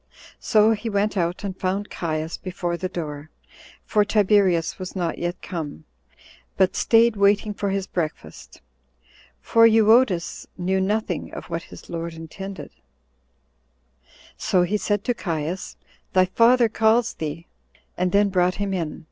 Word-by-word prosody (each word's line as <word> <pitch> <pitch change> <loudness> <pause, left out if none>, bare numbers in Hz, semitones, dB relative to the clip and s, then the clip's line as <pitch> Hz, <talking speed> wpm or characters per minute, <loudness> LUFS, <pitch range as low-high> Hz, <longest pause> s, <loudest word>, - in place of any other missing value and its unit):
So 215 0 +4
he 225 +1 -2
went 205 0 0
out, 175 +1 -1
and 195 -2 -4
found 195 +2 -2
Caius 160 -1 -3
before 175 -2 -4
the 185 +2 -4
door, 150 -3 -6 0.6
for 210 - +3
Tiberius 200 -5 +2
was 185 +1 -7
not 175 -3 -2
yet 175 +1 -3
come, 150 - -6 0.7
but 190 -1 +3
staid 230 0 +4
waiting 205 +1 +2
for 200 0 -2
his 195 -1 -1
breakfast; 155 - -6 0.8
for 230 0 +5
Euodus 220 -5 +3
knew 190 +1 0
nothing 210 +3 -2
of - - -9
what 165 0 -2
his - - -12
lord 170 -1 -5
intended; 190 +4 -8 1.6
so 180 -2 +1
he 185 +4 -1
said 205 -1 -1
to 245 - 0
Caius, 170 -3 -4 0.4
"Thy 185 0 +5
father 235 +5 +4
calls 225 +2 +2
thee," 160 +2 -5 0.5
and 180 0 0
then 200 +1 +3
brought 180 -1 +2
him 200 -1 -2
in. 165 -5 -3
190 Hz, 140 wpm, -23 LUFS, 170-210 Hz, 1.6 s, for